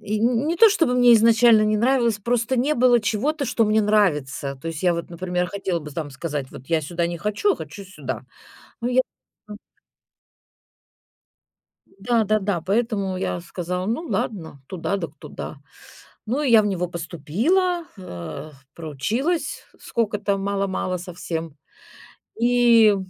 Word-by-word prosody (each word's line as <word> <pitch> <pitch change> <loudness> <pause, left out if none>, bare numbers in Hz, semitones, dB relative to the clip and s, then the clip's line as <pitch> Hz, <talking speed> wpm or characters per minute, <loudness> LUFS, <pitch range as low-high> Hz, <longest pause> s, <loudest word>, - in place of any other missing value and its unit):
И 215 0 -2
ни 235 +2 +2
не 335 +2 0
то 450 +6 +8
чтобы 330 - +2
мне 245 -1 +7
изначально 225 0 +6
не 215 0 +2
нравилось, 235 -2 +2
просто 235 +4 0
не 275 +5 +2
было 245 -1 +4
чего-то, 275 +8 -1
что 230 -1 +2
мне 215 +1 +3
нравится. 150 -10 +1
То 165 - -5
есть 165 0 -5
я 180 -1 +4
вот, 170 0 -4
например, 180 +1 -2
хотела 190 -1 -2
бы 150 -1 -9
там 150 0 -5
сказать: 145 -1 -4
"Вот 130 - -12
я 165 -2 +1
сюда 170 +3 -1
не 170 0 -4
хочу, 210 - +1
а - - -4
хочу 160 +6 -8
сюда". 145 - -6 0.6
Но 235 - -1
я 255 +1 +3 0.5
м. 210 - -7 2.3
Да-да-да, 205 -2 0
поэтому 200 0 -1
я 90 - -2
сказала: 180 - -4
"Ну 230 +9 -1
ладно, 160 - -3
туда 185 +4 -2
так 165 -6 -4
туда". 150 - -8 0.7
Ну, 250 +7 -1
я 235 -6 +6
в - - -2
него 180 -3 -1
поступила, 210 - 0
а, 90 - -8 0.2
проучилась 215 - -2 0.2
сколько-то, 210 -3 -1
мало-мало, 195 -2 -1
совсем, 165 -3 -6 0.8
и 235 -3 +5
200 Hz, 145 wpm, -23 LUFS, 170-235 Hz, 2.3 s, то